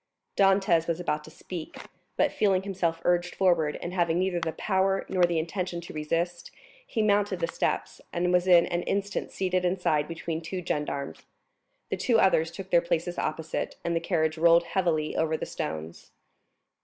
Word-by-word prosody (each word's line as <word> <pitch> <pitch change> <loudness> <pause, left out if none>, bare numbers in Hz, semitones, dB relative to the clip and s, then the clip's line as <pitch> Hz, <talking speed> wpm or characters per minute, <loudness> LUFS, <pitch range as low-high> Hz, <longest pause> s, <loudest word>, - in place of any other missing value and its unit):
Dantès 195 -4 +3
was 170 0 -1
about 150 -4 -1
to - - -11
speak; 165 +1 -8 0.4
but - - +3
feeling 190 -2 +2
himself 180 -4 -1
urged 175 0 +1
forward, 170 -5 +2
and 175 - -4
having 170 -2 +1
neither 185 -1 0
the 165 -1 -2
power 195 -1 0
nor 185 -2 +3
the 170 -1 -1
intention 175 +2 -2
to 170 - -10
resist, 165 +3 -2 0.4
he 225 - 0
mounted 205 -2 +2
the 165 - 0
steps, - - -2
and 180 +1 0
was 180 +1 +3
in 175 -2 +7
an 175 -1 -1
instant 200 +1 -2
seated 185 -1 0
inside 175 -5 +1
between 165 -1 -4
two 180 +2 -5
gendarmes; 145 -3 -3 0.6
the - - 0
two 235 -3 +2
others 165 -5 +3
took 190 +3 -9
their 170 - +5
places 170 +1 -2
opposite, 155 +1 -3
and 170 0 0
the - - +2
carriage 160 -2 0
rolled 170 +1 +6
heavily 170 -4 0
over 160 0 +1
the - - -4
stones. 80 +1 -6
175 Hz, 175 wpm, -27 LUFS, 160-185 Hz, 0.6 s, in